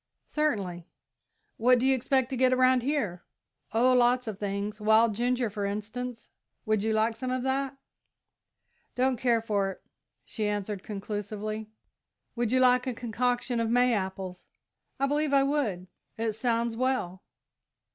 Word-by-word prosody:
"Certainly." 195 - -2 0.7
"What 250 +2 +5
do 245 - 0
you 270 - +5
expect 260 0 +1
to - - -1
get 255 0 +3
around 255 0 +4
here?" 235 - -1 0.5
"Oh, 245 +3 +4
lots 250 0 +3
of 215 -3 -5
things. 205 +1 -3
Wild 220 +1 +4
ginger, 245 +2 0
for 205 -1 -4
instance 220 +4 -4 0.4
would 215 -1 +1
you 220 +1 0
like 220 +1 +1
some 255 +3 -4
of 255 0 -1
that?" 270 +1 -1 1.2
"Don't 260 +1 +2
care 235 -2 +2
for 200 -3 0
it," 190 - -9 0.4
she 215 -2 -3
answered 205 -1 -2
conclusively. 210 +1 -5 0.7
"Would 235 -2 0
you 255 - +3
like 250 0 +4
a 250 - -2
concoction 245 +1 -1
of 230 -1 0
May 245 +1 +4
apples?" 190 -2 -4 0.5
"I 275 - +3
believe 290 +1 0
I 275 -1 +5
would 265 -11 -1 0.3
it 225 -1 -1
sounds 230 0 0
well." 245 -8 -1
230 Hz, 150 wpm, -28 LUFS, 210-255 Hz, 1.2 s, What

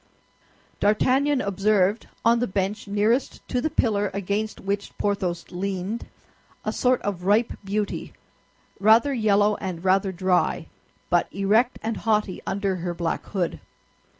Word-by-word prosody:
D'Artagnan 260 +7 +3
observed, 200 +1 +1 0.2
on 235 +1 +5
the 245 - 0
bench 200 +2 -2
nearest 210 +6 0
to 250 - 0
the 315 - 0
pillar 205 -7 +1
against 200 +2 -2
which 200 +1 -3
Porthos 190 -4 -1
leaned, 195 +4 -3 0.6
a - - -1
sort 250 0 +2
of 185 -3 -3
ripe 215 +4 +3
beauty, 200 +1 -3 0.7
rather 225 +7 +5
yellow 210 -3 +3
and 185 -2 -5
rather 190 +1 +3
dry, 185 0 +1 0.5
but - - +2
erect 215 +6 +2
and 225 0 -2
haughty 210 -4 0
under 195 -1 -1
her 175 0 -3
black 170 -1 -2
hood. 185 -4 -2
205 Hz, 130 wpm, -24 LUFS, 190-220 Hz, 0.7 s, on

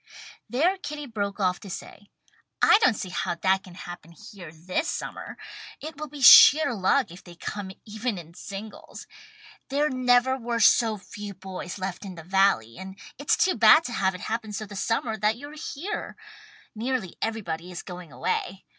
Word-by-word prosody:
There 335 +10 +2
Kitty 295 -4 -6
broke 205 -5 -4
off 180 -2 +1
to 200 - -11
say 200 +3 -9 0.5
"I 435 - +6
don't 440 - +4
see 190 - -5
how 175 - -2
that 190 +2 +1
can 185 -3 -13
happen 175 -2 -10
here 175 -2 -12
this 180 - -3
summer. - - -6 0.4
It 310 +1 -7
will 305 - -4
be 285 -1 -8
sheer 295 +2 +9
luck 200 +1 +1
if 175 - -12
they 175 -1 -13
come 200 +3 -6 0.2
even 220 +1 -3
in 170 -1 -10
singles. 200 +4 -9 0.6
There 290 +2 +1
never 255 0 +3
were 235 -1 -2
so 225 0 +4
few 200 +1 -9
boys 185 -1 -7
left 190 0 -5
in 190 -2 -8
the 165 - -10
Valley, 185 - +2
and 190 +1 -9 0.2
it's 285 - +1
too 370 - +3
bad 325 - +7
to 250 - -5
have 190 -5 0
it 180 - -9
happen 220 -1 -3
so 215 +2 -4
the 205 0 -11
summer 225 +2 -1
that 215 +2 +1
you're 290 +3 -10
here. 320 +6 -5 0.6
Nearly 230 -4 -3
everybody 180 -6 -3
is 175 - -7
going 180 -4 -9
away. 190 +6 -3
205 Hz, 180 wpm, -26 LUFS, 185-250 Hz, 0.6 s, sheer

